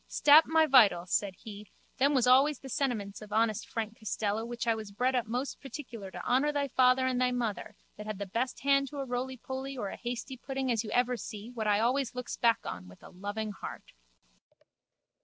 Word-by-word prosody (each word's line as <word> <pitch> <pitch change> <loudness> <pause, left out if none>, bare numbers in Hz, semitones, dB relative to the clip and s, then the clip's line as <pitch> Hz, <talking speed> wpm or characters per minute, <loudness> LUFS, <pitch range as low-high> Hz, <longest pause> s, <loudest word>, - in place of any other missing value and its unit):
Stap 300 +2 +6
my 320 0 +4
vitals, 205 - +5
said 200 -2 0
he, 210 -1 -10 0.3
them 280 +2 +3
was 255 -2 +3
always 270 +4 +5
the 270 - -11
sentiments 225 -8 -2
of 210 -1 -11
honest 220 -1 0
Frank 225 +1 -4
Costello 215 0 -2
which 240 +1 -4
I 230 - +3
was 215 -2 -7
bred 250 +6 0
up 245 -3 0
most 250 +5 -3
particular 255 - -8
to - - -8
honour 265 +4 +2
thy 285 -1 -1
father 255 +1 +4
and 255 -1 0
thy 250 - +3
mother 225 -4 -3 0.2
that 210 - -8
had 215 -2 -4
the 200 - -4
best 230 +7 -3
hand 275 0 +3
to 285 - -9
a 275 - -3
rolypoly 260 +2 -4
or 205 -5 -3
a - - -7
hasty 245 +2 -5
pudding 265 0 -3
as 225 -1 0
you 215 - -7
ever 245 +2 +1
see 215 +1 -8
what 225 -3 -3
I 205 0 +3
always 250 +2 0
looks 250 -1 -4
back 230 -1 +2
on 90 0 -6
with 90 - -16
a - - -11
loving 205 +3 -4
heart. 200 - -9
245 Hz, 215 wpm, -30 LUFS, 215-265 Hz, 0.3 s, Stap